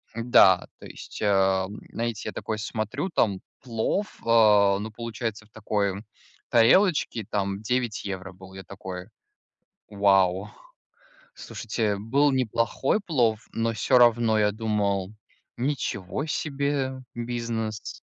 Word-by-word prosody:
Да, 115 -6 +5
то - - -12
есть, - - -10
а, 95 -2 +2
м, 105 - -9
знаете, 115 -2 -3
я - - -6
такой 110 - -4
смотрю: 115 - -3
там 100 - +1 0.2
плов, 125 - -2
а, 105 -4 +5
ну, 110 +2 -5
получается, 115 -1 -5
в - - -26
такой 105 -2 -2 0.5
тарелочке 120 - +3
там 100 -1 -2
9 120 0 -1
евро 95 -1 -5
был. 95 +1 -14
Я 95 0 -9
такой: 90 0 -8 0.8
"Вау!". 95 -2 +2 0.8
Слушайте, 105 -3 -3
был 135 +8 +2
неплохой 130 - 0
плов, 120 - 0
но 115 0 0
всё 125 +3 +3
равно 120 -2 +4
я 105 -1 +3
думал: 105 -3 -1 0.4
"Ничего 120 -4 -2
себе 140 -2 -2 0.2
бизнес". 115 -2 -4
110 Hz, 120 wpm, -26 LUFS, 100-120 Hz, 0.8 s, Да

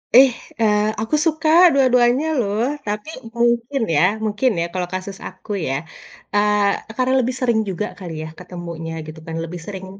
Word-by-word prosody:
Ih, 260 0 +9 0.3
eee, 210 -1 +4 0.2
aku 225 +7 0
suka 315 -1 +1 0.2
dua-duanya, 250 +1 +4
loh. 210 0 0 0.2
Tapi 210 +8 -3 0.3
mungkin 235 +3 +1
ya 145 - +4 0.2
mungkin 215 +5 +1
ya, - - +1
kalau 180 -1 -2
kasus 190 +1 -5
aku, 215 - -11 0.2
ya. 135 - -1 0.6
Eee, 205 0 +2
e - - -6
karena 255 0 +2
lebih 250 +1 0
sering 235 -3 +2
juga 190 +3 -2
kali 175 -3 -6
ya, - - -6
ketemunya, 170 -2 -7 0.2
gitu 155 +1 -9
kan. 165 - -5
Lebih 170 +1 -6
sering 190 -2 -6
210 Hz, 170 wpm, -20 LUFS, 185-250 Hz, 0.6 s, Ih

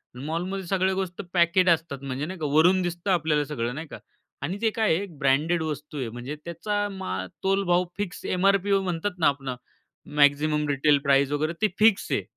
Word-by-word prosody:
मॉलमध्ये 175 +8 -4
सगळ्या 190 0 +1
गोष्ट 190 0 -3
पॅकेट 180 +1 +4
असतात 160 -5 +1
म्हणजे 135 +2 -3
नाही 185 +1 -7
का 155 - -2
वरून 180 +5 +5
दिसतं 175 +2 -2
आपल्याला 150 -4 +1
सगळं 125 -4 -3
नाही 160 +2 -6
का. - - -9 0.4
आणि 175 +8 -3
ते 225 - +3
काय 215 -7 +2
आहे 200 - -2
ब्रँडेड 150 +5 +2
वस्तू 150 -1 -5
आहे, 125 -5 -3
म्हणजे 120 +6 -6
त्याचा 205 +5 -2
मा 95 - -4 0.2
तोल 195 +1 +2
भाव 175 +1 +3
फिक्स 205 -3 -4
एमआरपी 195 +2 +2
अ, 195 - +4
म्हणतात 180 +1 -3
ना 160 - +4
आपण 140 -2 -1 0.7
मॅक्सिमम 150 +1 +3
रिटेल 145 +1 +3
प्राइज 140 0 +3
वगैरे 155 +3 0
ते 215 - +4
फिक्स 215 -2 +4
आहे - - +1
165 Hz, 190 wpm, -25 LUFS, 145-190 Hz, 0.7 s, वरून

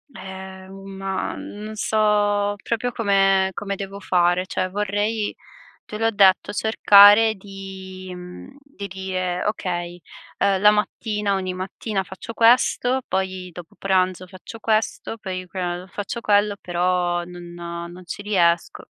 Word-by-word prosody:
Eh, 190 0 -9
un 195 0 -10
ma 195 0 -3
non 215 +1 -8
so 205 -1 +1
proprio 235 +2 -1
come 195 -4 +3
come 200 0 -4
devo 195 0 -7
fare, 180 -1 +2
cioè 185 - -1
vorrei, 205 +2 -1 0.5
te 210 - -7
l'ho 225 +1 +2
detto, 195 -3 +4
cercare 210 0 +6
di 190 -1 -9
mhmm, 180 +9 -10
di 280 -8 -9
dire: 185 -2 -3
"Okay, 175 -4 -3 0.4
uhm, 195 -1 +2
la 210 - +7
mattina 210 -1 -1
ogni 185 -1 -2
mattina 195 +2 -3
faccio 190 +5 -9
questo, 245 +2 +3
poi 185 -1 -2
dopo 175 -1 -12
pranzo 185 -1 +1
faccio 185 +5 -11
questo, 220 0 -1
poi 185 -4 -6
que 185 +2 -9
uhm, 180 0 -3
faccio 205 +5 -5
quello", 205 -1 +2
però 175 0 0
non 175 -1 -10 0.4
non 180 +1 -12
ci 175 - -7
riesco. 175 -5 +1
195 Hz, 135 wpm, -22 LUFS, 185-210 Hz, 0.5 s, la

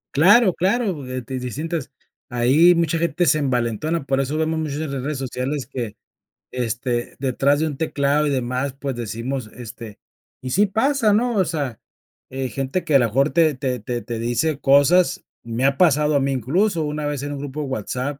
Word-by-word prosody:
Claro, 190 - +6
claro, 185 - -1
eh, 130 0 -4
di 130 -1 -4
distintas 150 +5 -4 0.4
ahí 135 +9 +4
mucha 165 -1 +1
gente 170 +1 +1
se 155 - +3
envalentona, 135 +4 -1
por 135 0 +1
eso 140 +3 -2
vemos 160 0 0
muchas 150 -3 -3
en 155 -3 -4
las 135 - -3
redes 145 +2 -3
sociales 130 +2 -3
que, 115 -5 -5 0.6
este, 120 0 -2
detrás 140 +2 +1
de 160 - +1
un 145 -3 -5
teclado 145 -1 +1
y 145 - 0
demás, 130 +1 -1
pues, 135 -1 -4
decimos, 120 +1 -4
este, 115 -3 -10 0.4
y 130 - -5
sí 200 +10 +3
pasa, 225 +2 +2
¿no? 235 +3 +1
O 190 -3 +3
sea, 145 - -3 0.5
eh, 130 0 -3
gente 135 +8 -2
que 150 - +1
a - - +8
lo 120 - +3
mejor 135 +6 +2
te 160 -2 +3
te 130 -1 -3
te 120 +3 -4
te 120 -1 -5
dice 120 +6 0
cosas. 170 +7 +4 0.2
Me 115 +2 -3
ha 135 0 +2
pasado 150 -3 +3
a - - +4
mí 135 0 0
incluso, 160 - +1
una 150 0 -3
vez 145 -2 -2
en 145 0 -4
un - - -5
grupo 145 +1 -5
de 145 - -4
WhatsApp, 130 +3 -3
140 Hz, 200 wpm, -22 LUFS, 125-160 Hz, 0.6 s, a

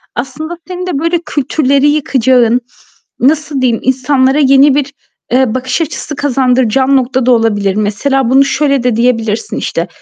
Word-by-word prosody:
aslında 310 +7 -5
senin 365 0 -6
de 295 -6 -2
böyle 335 +1 0
kültürleri 280 0 0
yıkacağın, 255 -4 +2 0.6
nasıl 290 0 0
diyeyim 240 -3 0
insanlara 260 +2 +1
yeni 275 0 +4
bir, 285 -1 -2 0.4
eee, 255 -2 +1
bakış 255 +4 -2
açısı 300 -1 -5
kazandıracağın 260 -1 +1
nokta 255 0 -1
da 255 - +3
olabilir. 205 -4 +1
Mesela 230 +5 -1
bunu 270 +2 +5
şöyle 275 -2 0
de 245 -2 0
diyebilirsin 225 -2 -1
işte. - - -3
265 Hz, 145 wpm, -12 LUFS, 245-285 Hz, 0.6 s, bunu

